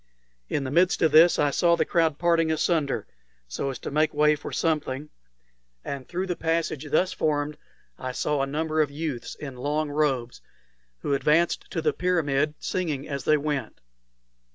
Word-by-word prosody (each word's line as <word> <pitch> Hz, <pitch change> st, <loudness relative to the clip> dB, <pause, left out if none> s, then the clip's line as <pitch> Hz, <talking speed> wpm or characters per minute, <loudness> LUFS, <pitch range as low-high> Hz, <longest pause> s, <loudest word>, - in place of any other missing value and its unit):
In 140 Hz, -, -1 dB
the 130 Hz, -, -4 dB
midst 175 Hz, +4 st, +3 dB
of 160 Hz, -, +4 dB
this 165 Hz, +3 st, +7 dB
I 145 Hz, -1 st, +2 dB
saw 170 Hz, +3 st, +3 dB
the -, -, +1 dB
crowd 160 Hz, -3 st, +1 dB
parting 165 Hz, -1 st, +2 dB
asunder 160 Hz, -2 st, 0 dB, 0.4 s
so 65 Hz, -, -3 dB
as 130 Hz, -, -4 dB
to -, -, -7 dB
make 155 Hz, +1 st, +1 dB
way 150 Hz, +1 st, +4 dB
for 145 Hz, -, -8 dB
something; 150 Hz, -2 st, -1 dB, 0.7 s
and 135 Hz, -3 st, -5 dB
through 185 Hz, +2 st, -2 dB
the 180 Hz, -2 st, -2 dB
passage 160 Hz, -3 st, -1 dB
thus 180 Hz, +5 st, +2 dB
formed 150 Hz, -1 st, -1 dB, 0.4 s
I 130 Hz, 0 st, -4 dB
saw 145 Hz, +2 st, -1 dB
a 135 Hz, -, 0 dB
number 155 Hz, +2 st, 0 dB
of 150 Hz, -, +1 dB
youths 145 Hz, -4 st, -5 dB
in 135 Hz, -4 st, -8 dB
long 145 Hz, +3 st, -1 dB
robes, 135 Hz, -5 st, -1 dB, 0.6 s
who -, -, -1 dB
advanced 150 Hz, +5 st, +2 dB
to 165 Hz, -, -3 dB
the 150 Hz, -2 st, +2 dB
pyramid, 155 Hz, -5 st, 0 dB
singing 155 Hz, -7 st, -3 dB
as 140 Hz, -2 st, -4 dB
they 155 Hz, -, +4 dB
went. 145 Hz, -5 st, -3 dB
150 Hz, 175 wpm, -26 LUFS, 140-165 Hz, 0.7 s, this